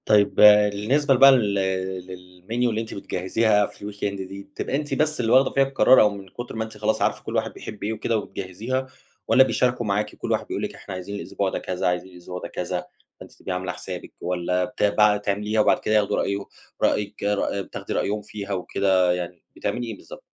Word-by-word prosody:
طيب 105 Hz, -1 st, +4 dB
بالنسبة 105 Hz, +7 st, +5 dB
بقى 135 Hz, +2 st, +9 dB
لل 105 Hz, -6 st, +2 dB, 0.8 s
للmenu 100 Hz, -, -17 dB, 0.2 s
اللي 110 Hz, -1 st, -1 dB
أنتِ 110 Hz, -, -7 dB
بتجهزيها 105 Hz, +3 st, +1 dB
في 100 Hz, +1 st, -8 dB
الweekend 100 Hz, 0 st, -3 dB
دي، 100 Hz, +1 st, -8 dB
بتبقى 145 Hz, 0 st, -4 dB
أنتِ 145 Hz, +1 st, -2 dB
بس 155 Hz, 0 st, 0 dB
اللي 115 Hz, -2 st, 0 dB
واخدة 130 Hz, +1 st, +5 dB
فيها 135 Hz, -, +4 dB
القرار 135 Hz, -1 st, +5 dB
أو 105 Hz, -, +5 dB
من 100 Hz, -1 st, -9 dB
كُتر 120 Hz, +5 st, -8 dB
ما 110 Hz, -, -1 dB
أنتِ 110 Hz, -1 st, -10 dB
خلاص 110 Hz, +1 st, 0 dB
عارفة -, -, 0 dB
كل -, -, -5 dB
واحد -, -, -1 dB
بيحب 105 Hz, -, -9 dB
إيه 105 Hz, +2 st, -1 dB
وكده 110 Hz, +1 st, -1 dB
وبتجهزيها 110 Hz, +7 st, -4 dB, 0.4 s
والّا 120 Hz, +4 st, +7 dB
بيشاركوا 125 Hz, -2 st, 0 dB
معاكِ، 105 Hz, +1 st, -1 dB
كل -, -, -5 dB
واحد -, -, 0 dB
بيقول -, -, -3 dB
لِك -, -, -4 dB
إحنا 100 Hz, -, -9 dB
عايزين 95 Hz, +2 st, -6 dB
الأسبوع 100 Hz, -1 st, -2 dB
ده -, -, -3 dB
كذا، 90 Hz, -1 st, -2 dB
عايزين 90 Hz, +1 st, -1 dB
الأسبوع 90 Hz, +1 st, -8 dB
ده -, -, -6 dB
كذا، -, -, -4 dB, 0.3 s
فأنتِ -, -, -12 dB
تبقي -, -, -7 dB
عاملة 90 Hz, 0 st, -3 dB
حسابِك 90 Hz, +1 st, -8 dB
والّا 90 Hz, +1 st, 0 dB
بت 105 Hz, -, -5 dB
بقى 105 Hz, 0 st, +4 dB
تعمليها 105 Hz, +2 st, 0 dB
وبعد -, -, +3 dB
كده 110 Hz, -, 0 dB
ياخدوا 105 Hz, -2 st, +2 dB
رأيه 100 Hz, -, 0 dB, 0.4 s
رأيِك 105 Hz, 0 st, 0 dB
رأ 100 Hz, -1 st, 0 dB
بتاخدي -, -, -6 dB
رأيهم 105 Hz, +1 st, -1 dB
فيها 100 Hz, -1 st, -6 dB
وكده، 95 Hz, -1 st, +2 dB
يعني 90 Hz, -1 st, -5 dB
بتعملي 120 Hz, -1 st, -3 dB
إيه 110 Hz, -3 st, -6 dB
بالضبط؟ -, -, -12 dB
105 Hz, 205 wpm, -24 LUFS, 95-110 Hz, 0.8 s, بقى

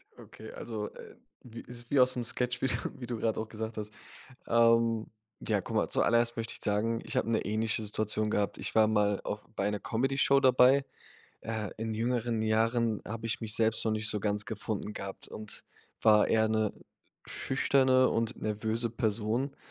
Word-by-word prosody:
Okay, -, -, -12 dB
also, 110 Hz, -3 st, -5 dB
äh, -, -, -12 dB, 0.3 s
wie 115 Hz, -2 st, -9 dB
is 120 Hz, 0 st, -7 dB
wie 145 Hz, -, +4 dB
aus 130 Hz, 0 st, +5 dB
'nem 125 Hz, -, -2 dB
Sketch, 125 Hz, +1 st, 0 dB
wie 135 Hz, -, +2 dB
du -, -, +2 dB, 0.3 s
wie 120 Hz, -, -5 dB
du 120 Hz, -1 st, -3 dB
grad 110 Hz, 0 st, 0 dB
auch 110 Hz, -, -3 dB
gesagt 110 Hz, 0 st, -5 dB
hast. 105 Hz, 0 st, -5 dB, 0.6 s
Ähm, 115 Hz, -1 st, +3 dB, 0.4 s
ja, -, -, +2 dB
guck -, -, -7 dB
mal, -, -, +2 dB
zuallererst 115 Hz, 0 st, +2 dB
möchte 115 Hz, 0 st, -4 dB
ich -, -, -8 dB
sagen, 110 Hz, +2 st, 0 dB
ich -, -, -4 dB
hab -, -, +2 dB
'ne 115 Hz, -1 st, +1 dB
ähnliche 110 Hz, +1 st, -1 dB
Situation 105 Hz, 0 st, -1 dB
gehabt. 105 Hz, -1 st, 0 dB
Ich -, -, -4 dB
war 110 Hz, -1 st, +6 dB
mal 105 Hz, -2 st, +2 dB
auch 105 Hz, 0 st, -4 dB
bei 100 Hz, -, 0 dB
'ner 105 Hz, -1 st, -3 dB
Comedyshow 135 Hz, +3 st, +2 dB
dabei. 130 Hz, +1 st, +5 dB, 0.6 s
Äh, 110 Hz, -2 st, -4 dB
in 110 Hz, 0 st, -3 dB
jüngeren 115 Hz, 0 st, 0 dB
Jahren, 110 Hz, 0 st, +1 dB
habe 115 Hz, +2 st, -5 dB
ich 115 Hz, -, -2 dB
mich 110 Hz, -2 st, -2 dB
selbst 110 Hz, -1 st, +2 dB
noch 110 Hz, -, +1 dB
nicht 110 Hz, +1 st, -1 dB
so 105 Hz, -, -1 dB
ganz 105 Hz, 0 st, 0 dB
gefunden 105 Hz, -1 st, -4 dB
gehabt 100 Hz, -2 st, -7 dB
und 105 Hz, -1 st, -7 dB, 0.4 s
war 105 Hz, -1 st, +5 dB
eher 110 Hz, 0 st, +3 dB
'ne 110 Hz, -1 st, +1 dB, 0.5 s
schüchterne 130 Hz, -1 st, +3 dB
und 115 Hz, 0 st, -1 dB
nervöse 110 Hz, +2 st, -1 dB
Person. 115 Hz, +4 st, -1 dB
110 Hz, 185 wpm, -30 LUFS, 110-120 Hz, 0.6 s, war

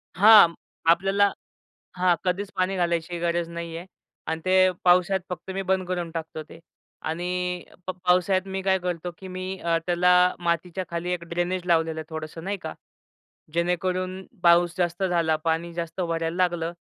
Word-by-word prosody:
हां, 200 Hz, -3 st, +8 dB, 0.4 s
आपल्याला 195 Hz, +3 st, +3 dB, 0.7 s
हां, 180 Hz, -1 st, +3 dB
कधीच 190 Hz, +2 st, -1 dB
पाणी 185 Hz, +1 st, 0 dB
घालायची 170 Hz, -1 st, -1 dB
गरज 170 Hz, 0 st, 0 dB
नाहीये 170 Hz, 0 st, -6 dB, 0.5 s
अन् 160 Hz, -, -3 dB
ते 185 Hz, 0 st, +2 dB, 0.3 s
पावसाळ्यात 180 Hz, +1 st, +4 dB
फक्त 180 Hz, +1 st, -6 dB
मी 195 Hz, -, -2 dB
बंद 190 Hz, -1 st, +1 dB
करून 175 Hz, -2 st, -2 dB
टाकतो 160 Hz, -1 st, -5 dB
ते -, -, -12 dB, 0.5 s
आणि 180 Hz, +1 st, -2 dB, 0.2 s
प 185 Hz, -, -1 dB
पावसाळ्यात 185 Hz, +1 st, +3 dB
मी 190 Hz, 0 st, -3 dB
काय 190 Hz, 0 st, +2 dB
करतो, 180 Hz, -1 st, -3 dB
की 190 Hz, -, -9 dB
मी 185 Hz, 0 st, -6 dB
अ, 170 Hz, -1 st, +1 dB
त्याला 180 Hz, +1 st, +4 dB
मातीच्या 175 Hz, +2 st, -1 dB
खाली 170 Hz, +1 st, -3 dB
एक 170 Hz, -1 st, -3 dB
ड्रेनेज 175 Hz, +1 st, -2 dB
लावलेलं 160 Hz, -2 st, +1 dB
आहे 155 Hz, -, -7 dB
थोडंसं 160 Hz, +1 st, -7 dB
नाही 200 Hz, +1 st, -2 dB
का, 160 Hz, -, -5 dB, 0.8 s
जेणेकरून 185 Hz, +2 st, -1 dB, 0.2 s
पाऊस 175 Hz, 0 st, +5 dB
जास्त 175 Hz, +1 st, -1 dB
झाला, 170 Hz, -3 st, +2 dB
पाणी 165 Hz, +2 st, -2 dB
जास्त 170 Hz, +1 st, -4 dB
भरायला 165 Hz, -1 st, -1 dB
लागलं 175 Hz, -2 st, 0 dB
175 Hz, 155 wpm, -25 LUFS, 170-185 Hz, 0.8 s, हां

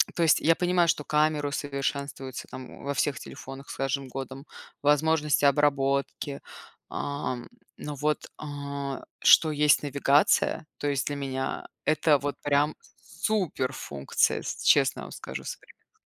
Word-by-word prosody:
то 170 Hz, -, -1 dB
есть 160 Hz, -, +4 dB
я 165 Hz, -, +5 dB
понимаю, 180 Hz, -1 st, +2 dB
что 150 Hz, -, +1 dB
камеру 150 Hz, -1 st, +2 dB
усовершенствуются 140 Hz, -1 st, -4 dB
там, 130 Hz, -1 st, -8 dB
о, -, -, -13 dB
во 140 Hz, 0 st, -2 dB
всех 140 Hz, -1 st, 0 dB
телефонах 135 Hz, +1 st, -10 dB
с -, -, -7 dB
каждым 135 Hz, 0 st, -1 dB
годом, 135 Hz, +2 st, -7 dB, 0.4 s
возможности 150 Hz, 0 st, +3 dB
обработки, 140 Hz, 0 st, +1 dB, 0.5 s
ам, 135 Hz, -4 st, -3 dB, 0.3 s
но 150 Hz, -1 st, -6 dB
вот, 150 Hz, +2 st, -1 dB
а, 140 Hz, -2 st, -5 dB, 0.2 s
что 160 Hz, -1 st, +7 dB
есть 150 Hz, 0 st, +4 dB
навигация, 145 Hz, +2 st, +3 dB
то 145 Hz, -, -3 dB
есть 140 Hz, -2 st, 0 dB
для 145 Hz, -, -1 dB
меня 135 Hz, -1 st, -3 dB, 0.2 s
это 155 Hz, -1 st, +4 dB
вот 145 Hz, +1 st, -3 dB
прям 145 Hz, +1 st, +2 dB, 0.3 s
суперфункция, 135 Hz, -, -1 dB
с -, -, -5 dB
честно -, -, +4 dB
вам -, -, -9 dB
скажу, -, -, -7 dB
современно. -, -, -11 dB
145 Hz, 140 wpm, -27 LUFS, 135-150 Hz, 0.5 s, что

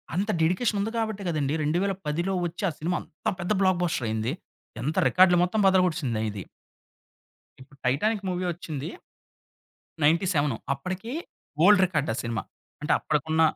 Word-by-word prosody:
అంత 200 Hz, +4 st, 0 dB
డెడికేషనుంది 200 Hz, +5 st, +1 dB
గాబట్టే 220 Hz, -3 st, -2 dB
గదండీ, 150 Hz, -3 st, 0 dB
2010లో 175 Hz, +1 st, -1 dB
వచ్చి 175 Hz, +3 st, -5 dB
ఆ -, -, -4 dB
సినిమా 175 Hz, +3 st, 0 dB
అంతా 155 Hz, -, -4 dB
పెద్ద 175 Hz, +3 st, -3 dB
బ్లాక్బస్టరయింది. 140 Hz, -, +1 dB, 0.5 s
ఎంత 155 Hz, +5 st, -2 dB
రికార్డ్‌లు 180 Hz, -1 st, +5 dB
మొత్తం 180 Hz, +5 st, 0 dB
బదలగొట్టసిందా 170 Hz, -, +2 dB
ఇది... 100 Hz, -1 st, -6 dB, 1.2 s
ఇప్పుడు 135 Hz, +1 st, -17 dB
'టైటానిక్' 200 Hz, -, +1 dB
మూవీ 180 Hz, 0 st, -2 dB
ఒచ్చింది... 155 Hz, -4 st, -6 dB, 1.1 s
97 155 Hz, -, +2 dB, 0.2 s
అప్పడికి 185 Hz, -, -5 dB, 0.5 s
ఓల్డ్ 205 Hz, 0 st, +7 dB
రికార్డా 150 Hz, -9 st, -1 dB
ఆ -, -, -2 dB
సినిమా. 115 Hz, -3 st, -2 dB, 0.4 s
అంటే, 150 Hz, -, -1 dB
అప్పడికున్న 155 Hz, +1 st, 0 dB
170 Hz, 125 wpm, -26 LUFS, 145-190 Hz, 1.2 s, ఓల్డ్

